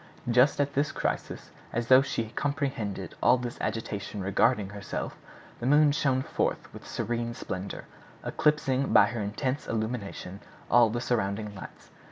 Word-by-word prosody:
Just 125 +5 +4
at 140 0 +1
this 145 +2 +1
crisis, - - -3 0.2
as 120 0 -1
though 130 +2 +7
she 115 -5 -2
comprehended 140 -7 -2
all 130 - +5
this 120 -1 -5
agitation 105 -2 -3
regarding 100 +2 +2
herself, 100 0 -5 0.4
the 120 - -2
moon 145 +1 +6
shone 135 -2 +1
forth - - -2
with - - -11
serene 120 +1 -2
splendor, 95 +2 -5 0.4
eclipsing 140 -3 +1
by - - +8
her 115 +1 -3
intense 130 +7 -2
illumination 110 -4 -4 0.3
all 120 -1 +6
the 120 +2 -2
surrounding 105 -3 -1
lights. 95 - -11
120 Hz, 145 wpm, -28 LUFS, 105-135 Hz, 0.4 s, by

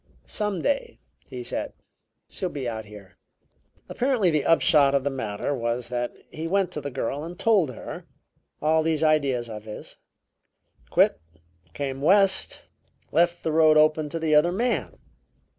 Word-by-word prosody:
'Some 210 -5 -2
day,' 470 - -1 0.3
he 370 - -6
said, - - -4 0.5
'she'll 185 - -3
be 140 -6 -5
out 110 -2 -4
here.' 105 -3 -14 0.7
"Apparently 240 -8 +1
the 150 -2 +1
upshot 145 -4 +4
of 140 - +1
the 140 - -1
matter 130 0 -3
was 120 -1 -2
that 120 -1 -2 0.2
he 160 +1 -5
went 195 0 +1
to 150 - -5
the 140 - -4
girl 140 +2 -3
and 170 +2 -8
told 200 -9 +3
her 125 - -8 0.6
all 160 +1 +3
these 160 -1 0
ideas 140 -6 +2
of 110 -1 -8
his; 105 - -9 0.9
quit, - - +3 0.5
came 135 -1 -4
West; 190 +4 +3 0.5
left 175 +2 +2
the 160 - 0
road 155 -1 +5
open 155 0 +3
to 165 - -4
the 160 -1 0
other 150 +4 +5
man. 235 +6 -1
155 Hz, 155 wpm, -25 LUFS, 135-175 Hz, 0.9 s, road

